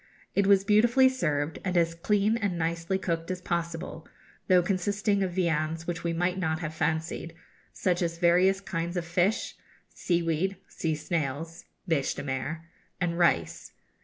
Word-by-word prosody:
It 200 -1 +2
was 200 -1 +5
beautifully 235 +6 +5
served, 150 - -1
and 185 -2 0
as 165 -1 +3
clean 205 +5 +1
and 200 -6 -1
nicely 165 +3 -1
cooked 165 -3 -3
as 185 0 -2
possible, 170 -2 -4 0.4
though 180 -1 +5
consisting 200 +2 0
of 185 -2 -1
viands 165 -2 0
which 170 -1 -4
we 170 - 0
might 180 +2 0
not 160 -3 0
have 160 -2 -5
fancied, 160 +1 -2 0.4
such 180 -1 0
as 170 -1 -1
various 180 +3 +4
kinds 170 -1 -3
of 170 - -2
fish, 175 +6 0 0.4
seaweed, 175 +2 0
sea 160 -2 -2
snails 160 +1 -3 0.2
(bêche 155 -5 +1
de - - -5
mer), 140 +4 -3 0.3
and 175 -2 -1
rice. 85 - +1
170 Hz, 155 wpm, -28 LUFS, 165-190 Hz, 0.4 s, was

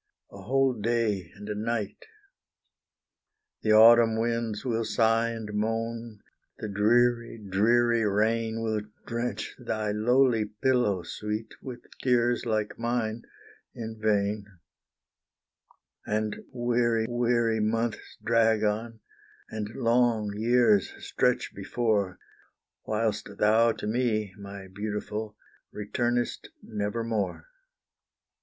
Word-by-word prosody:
a 100 - -11
whole 135 +5 +2
day 110 -5 -1
and 105 0 -10
a 105 - -2
night. 110 -1 -3 1.6
The 110 - +3
autumn 115 0 +7
winds 115 -1 -1
will 115 -2 0
sigh 115 +1 +2
and 110 -2 -6
moan; 115 +1 -3 0.3
the 110 - -5
dreary, 115 +3 +2
dreary 115 +3 +2
rain 110 +2 0
Will 110 -1 0 0.2
drench 115 -3 -3
thy 110 -3 -2
lowly 115 +1 +3
pillow, 105 -3 +1
sweet, 105 +5 -5
with 125 -2 -8 0.2
tears 120 -1 +2
like 110 -1 -1
mine 115 -1 -2 0.5
in 110 -1 -6
vain; 105 -1 +1 1.6
And 105 0 -1 0.2
weary, 120 -2 +1
weary 120 -2 +1
months 115 +1 -2
drag 115 -1 +3
on, 110 +2 -2 0.5
and 105 -1 -4
long 115 -3 +2
years 110 -2 +3
stretch - - 0
before, 105 -6 -1 0.7
Whilst 110 -1 -1
thou 110 +2 +4
to - - -7
me, 110 -3 0
my 100 -1 -9
beautiful, 105 +2 -5 0.3
returnest 120 +3 -2
nevermore. 110 0 -2
110 Hz, 100 wpm, -28 LUFS, 105-120 Hz, 1.6 s, autumn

